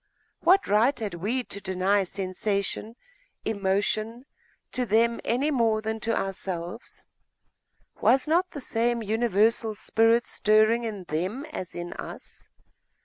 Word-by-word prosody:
What 370 +4 +4
right 230 +7 +3
had 210 -4 -3
we 215 +9 -1
to 200 -3 -5
deny 190 +2 +1
sensation, 200 +3 -3 0.5
emotion, 215 +3 -1 0.5
to 255 - -1
them, 230 +1 +2
any 270 +6 +1
more 230 -5 +2
than 220 +1 -3
to 230 +1 -1
ourselves? 190 +1 -5 1.0
Was 265 +3 +4
not 350 +4 +2
the 285 - -7
same 235 -1 0
universal 220 0 +2
spirit 225 +3 +2
stirring 215 +2 +3
in 210 -4 -5
them 185 - -3
as 185 - -6
in 175 0 -5
us? - - -10
220 Hz, 125 wpm, -26 LUFS, 195-235 Hz, 1.0 s, What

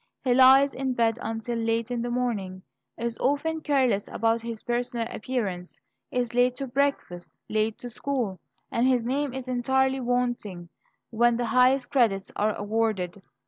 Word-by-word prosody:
He 255 -2 +3
lies 265 +2 +6
in 265 -1 -2
bed 230 -1 +1
until 225 +1 -3
late 230 +1 -1
in 240 -1 -1
the 240 - -3
morning, 210 -7 -2 0.3
is 235 0 -4
often 315 +4 0
careless 260 -9 +1
about 230 +1 0
his 230 -1 -6
personal 240 -1 -2
appearance, 205 -7 -4 0.3
is 245 -2 -2
late 245 +1 +3
to 275 - -4
breakfast, 260 -10 -1 0.2
late 215 0 0
to 245 - -8
school, 235 -8 -3 0.3
and 235 +2 +2
his 250 -3 +2
name 275 +3 -1
is 260 0 -6
entirely 265 +2 +1
wanting 240 -8 -2 0.4
when 235 +1 +3
the 240 - -1
highest 255 +1 +3
credits 220 -8 +1
are 210 0 +1
awarded. 205 -3 -1
240 Hz, 155 wpm, -26 LUFS, 225-255 Hz, 0.4 s, lies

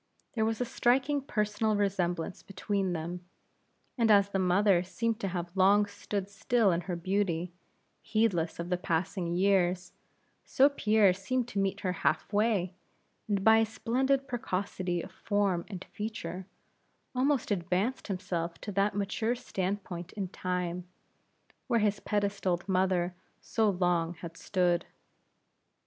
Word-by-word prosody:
There 220 -2 +1
was 225 0 -1
a 250 - 0
striking 265 +5 +2
personal 210 -3 0
resemblance 185 -4 -1
between 195 -1 -2
them; 175 +2 -4 0.8
and 230 -1 +4
as 200 -1 +6
the 195 - -1
mother 185 0 +4
seemed 225 +5 -2
to 200 - -2
have 175 -1 -4
long 200 +2 +5
stood 200 -1 -4
still 205 +1 +2
in 170 0 0
her 180 0 -4
beauty, 180 -1 -1 0.5
heedless 200 -7 +1
of 170 +1 -5
the 180 - +1
passing 175 +1 -1
years; 185 -1 +2 0.5
so 275 +2 +4
Pierre 215 -8 +4
seemed 245 +6 -2
to 200 - -2
meet 195 0 0
her 185 -3 0
half 160 +2 -1
way, 205 -4 +2 0.5
and 200 -2 0
by 220 +1 +7
a 225 - +4
splendid 265 +5 0
precocity 185 -7 -2
of - - -9
form 200 -5 0
and 190 -4 -7
feature, 190 -4 -5 0.7
almost 265 -2 +1
advanced 190 +6 0
himself 180 -4 -3
to 205 - -5
that 200 +1 +1
mature 205 +4 0
stand 200 -5 -3
point 175 -1 -7
in 195 -3 -3
Time, 180 -1 -3 0.8
where 235 -2 +3
his 210 -1 +1
pedestaled 200 -3 -1
mother 185 -2 +1 0.3
so 220 -2 +1
long 175 -3 +1
had 165 0 -9
stood. 175 -1 0
195 Hz, 140 wpm, -30 LUFS, 180-215 Hz, 0.8 s, by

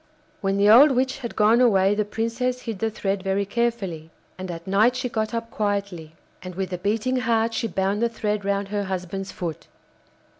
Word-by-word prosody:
When 195 -1 0
the 200 +1 +4
old 250 +8 +8
witch 260 +1 0
had 235 -3 -6
gone 220 +3 +4
away 195 -5 +4
the 210 +1 +1
Princess 230 +4 -2
hid 225 -6 -5
the 225 - 0
thread 200 -2 -2
very 195 +1 0
carefully, 200 -8 -2 0.3
and 185 0 -7
at 170 -1 -7
night 215 +6 +3
she 255 0 -2
got 220 -2 -2
up 230 -1 -4
quietly, 200 -6 -3 0.3
and 185 -1 -8
with 190 0 -3
a 180 - -3
beating 220 +6 0
heart 230 -2 +1
she 230 - -1
bound 195 +2 -1
the 235 - +2
thread 210 -2 -2
round 200 0 -1
her 205 -1 -2
husband's 190 +1 -4
foot. 170 -4 -6
205 Hz, 195 wpm, -24 LUFS, 195-230 Hz, 0.3 s, old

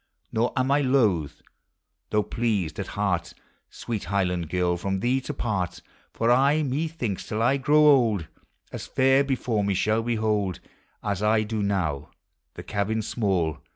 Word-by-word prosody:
Nor 115 +2 +1
am 130 +1 +1
I 145 +1 +4
loath, 110 - +1 0.7
though 105 0 +2
pleased 105 -9 -1
at 100 - -3
heart, 90 -5 -1 0.3
Sweet 110 -6 -5
Highland 90 -3 -1
Girl! 90 0 +1
from 95 +2 -2
thee 125 +5 +1
to 140 - -5
part; 95 - -2 0.3
For 115 +1 +1
I, 140 +5 +4
incthinks. 140 - -3
till 110 +1 -1
I 135 +4 +3
grow 150 +3 +4
old 115 - +4 0.5
As - - -6
fair 135 +1 +3
before 125 -6 -1
me 100 -1 0
shall 110 +4 +1
behold 110 -5 -1 0.4
As 100 -2 -2
I 110 +1 +3
do 110 0 -3
now, 95 -9 -1 0.5
the - - -8
cabin 105 +2 -1
small. 95 - -1
110 Hz, 155 wpm, -25 LUFS, 95-125 Hz, 0.7 s, I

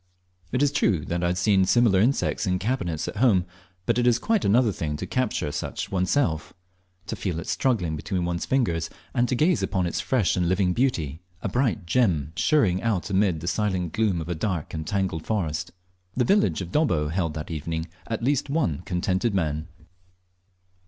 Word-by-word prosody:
It 125 - +1
is 145 - +3
true 95 - +1
I - - -3
had 85 +1 0
seen 95 +1 +3
similar 110 -2 +4
insects 115 -1 +1
in 90 0 +1
cabinets 95 -7 -2
at - - -5
home, 100 -7 +4 0.4
but 115 +1 +2
it 120 - +2
is 120 -1 +5
quite 220 - +1
another 115 +2 +4
thing 75 -5 -3
to - - -4
capture 125 -12 -1
such 75 - -4
oneself 90 - 0 0.5
to - - -4
feel 90 -4 -3
it 85 - -6
struggling 95 -12 0
between 90 +3 -2
one's 85 0 -2
fingers, 85 -12 +1 0.2
and 120 -1 +1
to 130 - +1
gaze 160 +6 +2
upon 95 -3 0
its 85 +2 -1
fresh 115 -8 +1
and 90 -1 +1
living 95 -1 +2
beauty, 85 - 0 0.2
a - - -1
bright 120 - 0
gem 85 - +1
shirring 100 - +2
out 105 -4 -1
amid 95 -4 +2
the 85 - -6
silent 95 -3 -1
gloom 105 -5 +1
of 80 - -6
a - - 0
dark 85 -2 -3
and 80 -1 -4
tangled 95 -6 -1
forest. 85 -8 -1 0.5
The 125 - +3
village 200 - +2
of 90 -1 -6
Dobbo 85 - +1
held 85 -3 -1
that 80 +2 -5
evening 80 +1 -3 0.2
at 115 0 -3
least 140 +2 +1
one 140 - 0
contented 95 +4 0
man. 80 -3 -1
95 Hz, 185 wpm, -25 LUFS, 85-120 Hz, 0.5 s, is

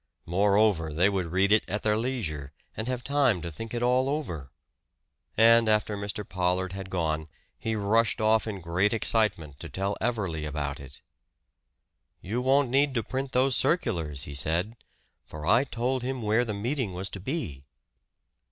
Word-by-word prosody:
Moreover, 100 -2 +2
they 90 +6 +3
would 95 -3 -1
read 95 +4 +1
it 110 - +5
at 105 +2 -2
their 105 -1 +2
leisure, 105 - -3 0.2
and 110 - -4
have 125 -1 -2
time 140 -9 +2
to 85 - -4
think 115 +8 -7
it 120 0 -2
all 125 +2 +2
over! 85 - -3 0.9
And 115 0 +6
after 105 0 +2
Mr. 100 0 -4
Pollard 90 0 0
had 95 -1 -6
gone, 80 -4 -1 0.3
he 110 0 -2
rushed 110 +2 +2
off 110 +1 +3
in 100 -3 -5
great 90 +6 +1
excitement 95 -11 0
to - - -7
tell 100 +1 -2
Everley 100 -10 -1
about 75 -1 -3
it. 70 -1 -10 1.2
"You 115 +7 -3
won't 135 0 +3
need 140 0 +2
to 115 - +1
print 135 +1 -4
those 130 0 +3
circulars," 85 - 0
he 70 - -7
said. 85 - 0 0.5
"For 75 0 -8
I 115 - +5
told 130 0 -1
him 130 -1 -3
where 110 +3 +2
the 105 -3 -3
meeting 115 -2 -2
was 95 +2 -2
to 95 - -6
be." 100 - -4
105 Hz, 170 wpm, -27 LUFS, 90-120 Hz, 1.2 s, And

